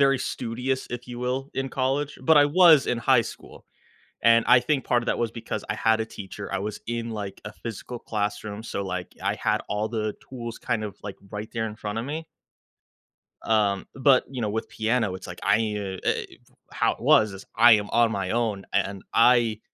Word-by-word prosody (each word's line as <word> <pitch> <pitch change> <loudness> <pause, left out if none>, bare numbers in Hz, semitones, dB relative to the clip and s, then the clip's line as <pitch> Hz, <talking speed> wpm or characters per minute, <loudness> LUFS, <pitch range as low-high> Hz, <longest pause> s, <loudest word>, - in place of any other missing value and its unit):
very 135 -1 +4
studious, 125 +2 -3
if 120 0 -6
you 120 -1 -6
will, 130 +3 -2
in 135 0 -2
college, 135 +3 -1
but 155 +4 +5
I 145 - +8
was 160 -3 +6
in 120 - 0
high 120 0 +4
school. - - -11 0.6
And 115 0 +6
I 125 0 +7
think 135 +2 0
part 120 -1 +2
of - - -8
that - - +1
was 115 -1 -1
because 115 - -5
I - - -1
had 110 0 +2
a 110 - -1
teacher, 100 -1 -8
I 100 - 0
was 105 +2 -4
in, 115 0 -3
like, 100 -3 -6
a 105 - -7
physical 115 +3 -7
classroom, 105 -1 -3
so, 100 - -4
like, 90 -1 -5
I - - +1
had - - 0
all 105 +1 -1
the 110 -2 -2
tools 120 -3 -7
kind 110 -2 -2
of, 100 -2 -7
like, 100 -1 -7
right 105 +1 -5
there 115 -1 -1
in 105 -1 -7
front 105 0 -4
of 115 - -3
me. 155 +4 -5 1.2
Um, 105 -3 +1
but, 135 -1 +4
you 130 -2 -5
know, 105 - 0
with 110 +2 -3
piano, 110 -3 0
it's 95 - -8
like 90 0 -9
I 100 +1 +4
ee 110 -2 -1 0.3
uh, - - +1
eh, - - 0 0.5
how - - +2
it - - -11
was 110 -2 +4
is, 95 0 -10
"I 120 +1 +8
am 105 -1 +3
on 115 0 +3
my 95 -4 -2
own," 110 -4 -1
a - - +4
and 100 -1 -3
I 115 -2 +4
115 Hz, 220 wpm, -25 LUFS, 105-125 Hz, 1.2 s, I